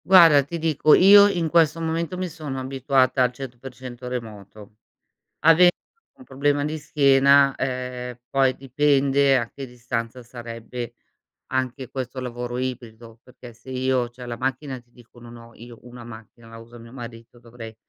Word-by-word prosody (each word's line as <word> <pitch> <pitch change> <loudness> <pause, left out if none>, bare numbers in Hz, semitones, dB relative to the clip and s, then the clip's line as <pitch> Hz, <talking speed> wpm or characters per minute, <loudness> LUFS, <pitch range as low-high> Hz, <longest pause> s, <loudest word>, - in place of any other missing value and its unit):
Guarda, 165 -6 +7
ti 170 +5 -6
dico, 155 -2 +3
io 200 +2 +8
in 175 -5 -1
questo 165 -1 +3
momento 165 +2 -3
mi 185 0 -3
sono 150 -5 -7
abituata 130 0 +1
al 125 -1 +3
100% 125 -1 -10
a - - -5
remoto. 105 -3 -9 0.6
Ave 165 +3 +6 0.5
un 265 - -16
problema 145 - -1
di 155 +1 -3
schiena, 140 -2 +4
ehm, 125 -1 -5
poi 135 -1 +2
dipende 140 0 +2
a 115 -2 -4
che 135 - -8
distanza 120 0 -5
sarebbe 120 0 -8 0.5
anche 130 0 -3
questo 130 -1 -6
lavoro 120 0 -5
ibrido, 120 -3 -7
perché 125 -2 -14
se 120 +3 -14
io 130 -1 -1
c'è 125 0 -11
la 120 -1 -5
macchina 130 +3 -3
e 125 - -10
ti 120 - -36
dico, 120 0 -19
non 120 0 -12
ho, 115 0 -15
io, 120 0 -13
una 120 0 -12
macchina, 115 0 -13
la 115 0 -12
usa 115 +1 -14
mio 115 0 -14
marito 120 -2 -11
dovrei 115 -1 -11
130 Hz, 165 wpm, -23 LUFS, 120-140 Hz, 0.6 s, io